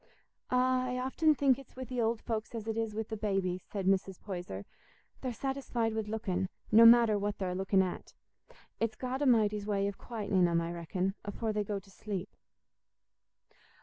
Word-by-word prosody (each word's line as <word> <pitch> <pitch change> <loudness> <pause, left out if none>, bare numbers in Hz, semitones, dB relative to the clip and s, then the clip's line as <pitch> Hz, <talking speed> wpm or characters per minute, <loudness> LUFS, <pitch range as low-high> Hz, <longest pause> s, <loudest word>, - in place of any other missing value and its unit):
"Ah, 255 0 +3
I 250 0 -2
often 295 +5 +2
think 275 -2 +3
it's 270 - -15
wi' 260 - -5
th' 255 -1 -4
old 225 0 0
folks 225 0 -3
as 220 -2 -5
it 225 - -1
is 225 -2 -2
wi' 220 - -1
the 220 +1 -6
babbies," 195 -4 -1
said 195 0 -5
Mrs. 190 -1 +1
Poyser; 175 - -6 0.6
"they're 255 - -2
satisfied 245 -2 -2
wi' 220 - 0
looking, 205 -4 -2 0.2
no 230 +1 +9
matter 230 -3 +6
what 205 0 -2
they're 185 -2 -2
looking 190 +1 +2
at. 185 - -6 0.6
It's 225 -1 0
God 255 +3 -3
A'mighty's 215 -6 +3
way 200 -1 +1
o' - - 0
quietening 200 -4 0
'em, 170 -1 +2
I 170 0 -3
reckon, 180 +3 -2
afore 215 +2 -3
they 210 0 0
go 205 0 -3
to 195 0 -11
sleep." 195 -2 -5
215 Hz, 180 wpm, -32 LUFS, 195-235 Hz, 0.6 s, no